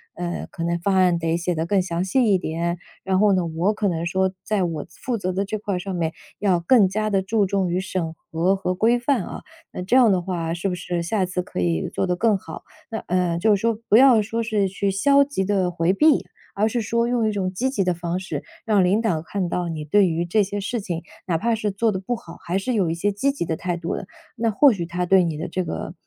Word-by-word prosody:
嗯， 175 0 -4
可 165 - -5
能 170 0 0
方 195 +2 +1
案 180 -2 +4
得 165 0 0
写 175 0 -1
得 160 - -1
更 190 +2 +2
详 175 -1 -2
细 245 +7 +2
一 190 - +5
点， 170 +1 -2 0.3
然 190 -1 +1
后 210 0 +5
呢， 185 -2 +1
我 170 +6 0
可 210 -1 -1
能 170 -2 -1
说 190 +2 +1
在 210 -3 0
我 165 -4 -3
负 245 -3 -4
责 185 -2 -2
的 195 +2 0
这 215 +2 -3
块 205 -2 -3
儿 180 - -2
上 190 0 -4
面， 165 -2 -1 0.3
要 190 -4 +2
更 200 +3 +5
加 215 +2 -1
地 195 -2 +2
注 205 +2 +1
重 190 -1 0
于 180 - +1
审 185 -4 -3 0.2
核 175 +4 +2
和 190 -1 -2
规 230 +5 +3
范 245 -3 +1
啊， - - -7 0.3
那 - - -6
这 190 +7 +1
样 245 -4 +6
的 185 -2 +2
话， 170 -2 -3
是 175 +3 -2
不 180 - -2
是 175 -1 -3
下 190 +3 0
一 - - +2
次 180 0 -2
可 180 - -6
以 85 -2 0
做 - - -1
得 180 -1 0
更 220 +1 +2
好？” 165 -3 -10 0.3
那 220 - -2
呃， 180 -1 +1
就 210 +2 +4
是 - - -3
说 230 0 +2 0.2
不 - - +5
要 250 -3 +7
说 225 +2 -2
是 210 -3 +1
去 195 +1 -1
消 280 +8 +4
极 275 -9 -2
地 190 -2 +1
回 175 +1 +1
避， 300 +6 +4 0.3
而 210 +2 +2
是 235 +1 -1
说 235 +2 0
用 240 -2 +1
一 - - +1
种 190 -3 -2
积 255 +8 0
极 260 -7 0
的 180 -1 +1
方 175 +1 -3
式， 190 - -5 0.2
让 210 -4 +3
领 195 +5 +2
导 180 -9 0
看 185 +2 -3
到 175 0 -2
你 155 -2 -4
对 195 +6 +4
于 170 0 -1
这 205 +4 +2
些 200 +1 -4
事 220 +4 -2
情， 175 -3 -4 0.2
哪 165 - +1
怕 230 +7 0
是 215 -1 -2
做 215 +3 +1
得 190 - -3
不 240 +6 -2
好， 165 -7 -11
还 175 +2 -2
是 225 +6 -1
有 190 -7 +1
一 - - 0
些 205 +5 0
积 270 +8 0
极 275 - -3
的 160 -1 -1
态 175 0 -3
度 170 0 -3
的， 185 - -6 0.3
那 230 0 0
或 275 +7 +6
许 175 -5 -3
他 175 +1 -2
对 190 0 +5
你 165 -3 -2
的 160 - -4
这 185 - -2
个 80 - -5
190 Hz, 290 characters per minute, -23 LUFS, 175-215 Hz, 0.3 s, 要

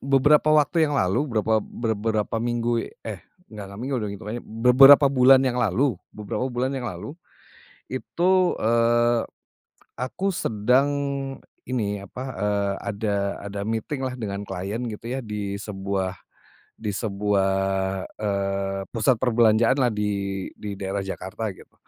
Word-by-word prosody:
beberapa 140 +3 +4
waktu 155 +1 +4
yang 145 - -1
lalu, 100 +8 +1
berapa 110 -1 +1
ber 115 +1 -3
berapa 110 +1 -1
minggu 120 0 -1 0.2
eh, 105 -5 -5 0.3
enggak 105 -2 -7
enggak 100 +2 -9
minggu 130 +2 -2
deh 105 - -3
itungannya 110 +4 -6
beberapa 130 +5 +7
bulan 130 +1 +6
yang 125 -1 0
lalu. 115 0 +1 0.2
Beberapa 105 +4 -3
bulan 125 +2 -1
yang 130 -3 -3
lalu, 100 +6 -7 0.8
itu, 180 - +1
eee, 120 +1 +3 0.7
aku 130 - -3
sedang 125 +6 +2 0.7
ini, 105 -6 -2
apa, 125 +6 -8
eee, 100 0 0
ada 100 0 -2 0.3
ada 100 0 -6
meeting 115 +6 -3
lah 130 - -1
dengan 100 -2 -4
klien 100 +4 -4
gitu 110 +2 -8
ya, 130 +2 -3
di 105 -2 -4
sebuah 95 -2 -3 0.6
di 105 -3 -3
sebuah, 100 -2 0 0.7
eee, 100 -1 -1
pusat 115 +1 +2
perbelanjaan 115 0 +4
lah 125 - +3
di 100 -2 -2
di 100 -2 -7
daerah 100 0 -3
Jakarta, 95 +3 -5
gitu. 95 - -15
110 Hz, 135 wpm, -24 LUFS, 100-125 Hz, 0.8 s, beberapa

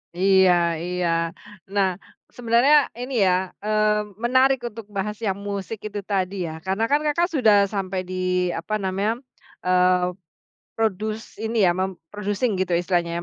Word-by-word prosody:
Iya, 190 0 +5 0.3
iya. 180 0 -1 0.6
Nah, 200 -2 +2 0.5
sebenarnya 245 +5 +4
ini, 250 -4 0
ya, 185 0 +2 0.2
eee, 215 0 +2 0.2
menarik 260 +2 +4
untuk 225 -1 -9
bahas 205 +1 -3
yang 195 -1 -1
musik 200 +1 -5
itu 205 -1 -6
tadi 195 -1 -1
ya, 160 0 -7
karena 195 +4 0
kan, 290 - +4
Kakak 340 +4 +1
sudah 225 -9 +4
sampai 190 -2 -2
di, 180 -1 -1
apa 195 +6 -3
namanya, 205 +5 -1 0.4
eee, 180 0 +3 0.6
produce 215 0 -2
ini 225 -1 0
ya, 175 - +5
mem-producing 195 +5 -2
gitu 180 -2 +1
istilahnya 175 -1 0
200 Hz, 135 wpm, -23 LUFS, 185-220 Hz, 0.6 s, Iya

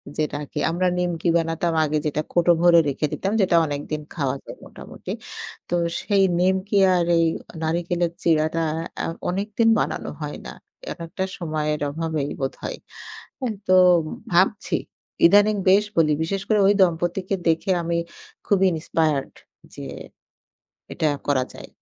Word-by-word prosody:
যে - - -7
এটা 145 - -6
কি - - -3
আমরা 175 +3 0
নিমকি 175 -1 -1
বানাতাম 165 +1 -1
আগে 155 0 0
যেটা 150 0 0
কৌটো 175 0 +3
ভরে 175 -1 +7
রেখে 140 +3 -1
দিতাম 195 - -2
যেটা 185 -2 +3
অনেকদিন 145 +1 -4
খাওয়া 140 -5 -1
যায় - - -9
মোটামুটি। - - -10 0.6
তো - - -3 0.3
সেই 200 -1 +2 0.2
নিমকি 190 +2 +1 0.2
আর 175 -1 +2
এই 165 - +4 0.4
নারিকলের 170 +1 0
চিড়াটা 160 0 +2 0.4
আ - - -1 0.2
অনেকদিন 205 +5 0
বানানো - - -2
হয় - - -4
না। - - -6 0.4
একএকটা 170 +2 -5
সময়ের 155 -3 -2
অভাবেই 155 -1 -2
বোধহয়। 135 - -4 0.6
হ্যাঁ? 250 -5 -2
তো 185 - +2 0.6
ভাবছি, 190 +4 +2 0.5
ইদানিং 205 +4 +5
বেশ 200 +3 +5
বলি। 160 -2 +4
বিশেষ 195 +4 -2
করে 215 - +3
ওই 205 - +5
দম্পতিকে 175 +2 +1
দেখে 165 +4 +1
আমি 170 0 -1 0.5
খুবই 195 -2 +3
Inspired 155 -3 -1 0.4
যে - - -8 1.1
এটা 160 - -1 0.2
করা 140 -3 +2
যায়। - - -10
170 Hz, 140 wpm, -23 LUFS, 155-190 Hz, 1.1 s, ভরে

